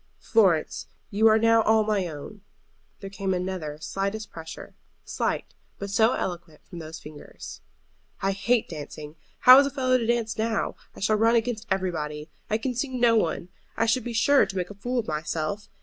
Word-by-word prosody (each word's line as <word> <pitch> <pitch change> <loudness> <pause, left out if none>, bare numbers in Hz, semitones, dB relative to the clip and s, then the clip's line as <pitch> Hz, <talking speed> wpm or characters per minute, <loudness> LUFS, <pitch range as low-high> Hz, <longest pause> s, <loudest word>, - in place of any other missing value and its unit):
"Florence, 190 -9 +2 0.2
you 215 +2 +4
are 220 0 +6
now 230 0 +4
all 220 0 +3
my 210 -4 0
own." 165 +7 -9 0.6
There 195 - -6
came 195 -1 -2
another 180 -5 -4
slightest 195 +6 -3
pressure, 160 -1 -9 0.3
slight, - - -2 0.2
but 200 0 -6
so 220 +4 +4
eloquent 170 -4 -5
from 175 - -10
those 160 0 -8
fingers. 150 -1 -11 0.6
"I 195 - 0
hate 220 +4 +1
dancing. 150 -1 -8 0.3
How 255 +1 +10
is 280 - +4
a - - -2
fellow 255 -2 +1
to 230 - -2
dance 230 -2 0
now? 225 -1 -1 0.2
I - - -11
shall 215 +2 +2
run 225 +2 +4
against 230 -1 -1
everybody. 155 -5 -2 0.2
I 215 - +2
can 250 +3 -3
see 250 +4 -1
no 240 -2 +4
one. 170 -3 0 0.3
I 230 - +2
should 230 +2 +1
be 240 - -5
sure 275 +5 +4
to 195 - -6
make 180 +1 -3
a - - -7
fool 245 +6 -4
of 235 - -1
myself. 155 +5 -3
205 Hz, 185 wpm, -26 LUFS, 170-230 Hz, 0.6 s, How